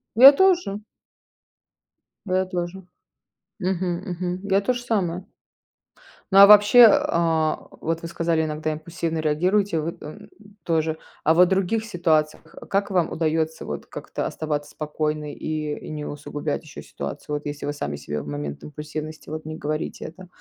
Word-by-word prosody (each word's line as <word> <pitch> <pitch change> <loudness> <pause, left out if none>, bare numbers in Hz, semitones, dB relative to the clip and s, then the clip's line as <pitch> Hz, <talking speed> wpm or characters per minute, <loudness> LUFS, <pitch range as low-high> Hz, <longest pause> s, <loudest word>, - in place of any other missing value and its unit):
Я 260 +5 +11
тоже. 345 - +2 1.4
Я 185 -1 +1
тоже. 180 0 -4 0.8
Мгм, 185 -2 -1
мгм. 180 0 -3
Я 200 0 +2
тоже 245 +4 -1
самое. 185 -6 -1 1.1
Ну, 195 - +6
а 200 - +11
вообще, 210 +4 +9
а, 165 -5 +1
вот 165 0 -2
вы - - -4
сказали, 165 -1 0
иногда 155 0 -2
импульсивно 165 +1 -4
реагируете, 170 +4 +1
вы, 165 +2 -4
эм, 150 - -10 0.3
тоже. 160 -1 0 0.3
А 160 - +5
вот 180 +2 +6
в - - -4
других 195 +3 +1
ситуациях 160 -6 0
как 200 +1 0
вам 180 -4 +1
удается 160 0 -1
вот - - -5
как-то - - -5
оставаться 150 -2 -3
спокойной 150 -1 -3
и - - -5 0.3
и - - -9
не 150 -1 -5
усугублять 145 0 -4
еще 150 -3 -10
ситуацию, 70 - -6
вот 145 - -5
если 145 0 -5
вы 145 - -2
сами 75 - -4
себе 75 +1 -4
в 70 - -11
момент 70 0 -5
импульсивности 155 +1 -7
вот 155 +1 -5
не 155 0 -6
говорите 155 0 -4
это, 185 +3 -10
165 Hz, 155 wpm, -23 LUFS, 155-185 Hz, 1.4 s, Я